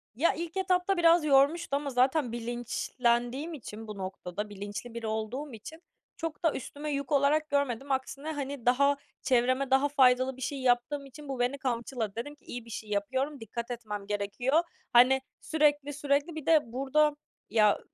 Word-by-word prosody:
Ya, 315 +8 +3
ilk 340 +2 -5
etapta 370 0 +1
biraz 335 -1 +5
yormuştu 285 +2 +3
ama 285 0 -2
zaten 255 0 +2
bilinçlendiğim 240 +4 -1
için, 225 -5 -8
bu 210 -1 -7
noktada 190 +1 -5
bilinçli 205 +4 -7
biri 230 -1 -4
olduğum 225 +6 -3
için 315 +10 -10 0.4
çok 325 -1 -5
da 325 - +3
üstüme 290 +3 -5
yük 280 +1 -3
olarak 295 +2 +3
görmedim. 275 -1 0
Aksine, 275 +3 -2
hani, 280 -4 -5
daha 280 +3 +4 0.2
çevreme 255 +1 +2
daha 270 +2 +4
faydalı 260 -2 +4
bir - - -11
şey 270 +1 -3
yaptığım 255 +3 +1
için 285 +2 -12
bu 265 -2 -4
beni 250 +3 +1
kamçıladı. 235 -4 -3
Dedim 290 +6 -5
ki - - -31
"İyi 240 -1 -7
bir - - -13
şey 215 -1 -7
yapıyorum, 260 +8 -1
dikkat 235 +2 -6
etmem 210 -4 -5
gerekiyor." 210 +9 +1 0.3
Hani, 255 +2 +6 0.2
sürekli 295 -2 +2
sürekli, 285 +3 0
bir 310 -3 -6
de 325 -1 +6
burada, 290 +4 +2 0.3
ya, 210 -2 +4
265 Hz, 165 wpm, -29 LUFS, 235-290 Hz, 0.4 s, Hani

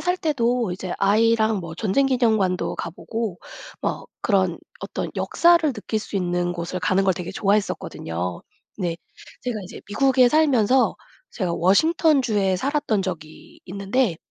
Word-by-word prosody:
살 360 +1 0
때도 245 - 0
이제 185 0 -5
아이랑 220 +1 +3
뭐 165 -2 -7
전쟁 225 +8 +1
기념관도 220 -8 +1
가 - - -4
보고 220 +1 -5 0.4
뭐 - - -3 0.2
그런 190 -5 +1 0.2
어떤 - - -4
역사를 335 -4 +3
느낄 215 0 -3
수 210 - -6
있는 175 -1 0
곳을 175 +1 -4
가는 185 +2 +2
걸 190 - +3
되게 180 -1 -6
좋아했었거든요. 90 - -2 0.4
네. 175 -4 -2 0.5
제가 240 -4 -3
이제 - - -10
미국에 260 +3 +4
살면서 260 -4 +3 0.4
제가 180 -5 -2
워싱턴주에 215 - +3
살았던 270 -3 0
적이 160 -5 -8
있는데 200 +1 0
205 Hz, 300 characters per minute, -23 LUFS, 180-250 Hz, 0.5 s, 미국에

